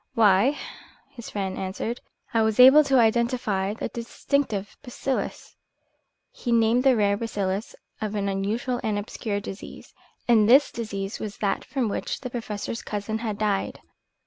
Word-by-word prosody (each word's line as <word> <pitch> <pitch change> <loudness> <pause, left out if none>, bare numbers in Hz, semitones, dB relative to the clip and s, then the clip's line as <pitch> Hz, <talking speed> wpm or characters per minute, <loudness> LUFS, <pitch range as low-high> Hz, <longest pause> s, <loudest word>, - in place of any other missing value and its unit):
"Why," 220 +6 +4 0.5
his 240 -5 -9
friend 195 -2 -3
answered, 195 +5 -4 0.3
"I 225 - +3
was 220 +1 +1
able 265 +4 +9
to 270 -1 +3
identify 225 -4 +1
the - - -3
distinctive 230 -3 -2
bacillus 260 +1 -4 0.4
" - - -47 0.3
He 240 - -4
named 230 +2 +3
the 265 -2 +5
rare 205 -2 +2
bacillus 200 -2 -3 0.3
of 215 -1 -3
an 200 -1 -1
unusual 210 +6 -1
and 215 -2 0
obscure 205 0 -3
disease. 195 0 -9 0.3
And 220 -3 +5
this 275 +4 +6
disease 200 -3 -5
was 210 -2 -6
that 200 - -1
from 260 -5 -2
which 205 - -3
the 250 - -6
Professor's 225 -1 -4
cousin 210 +1 -4
had 220 -3 -3
died. 205 -2 -1
220 Hz, 150 wpm, -25 LUFS, 200-240 Hz, 0.5 s, able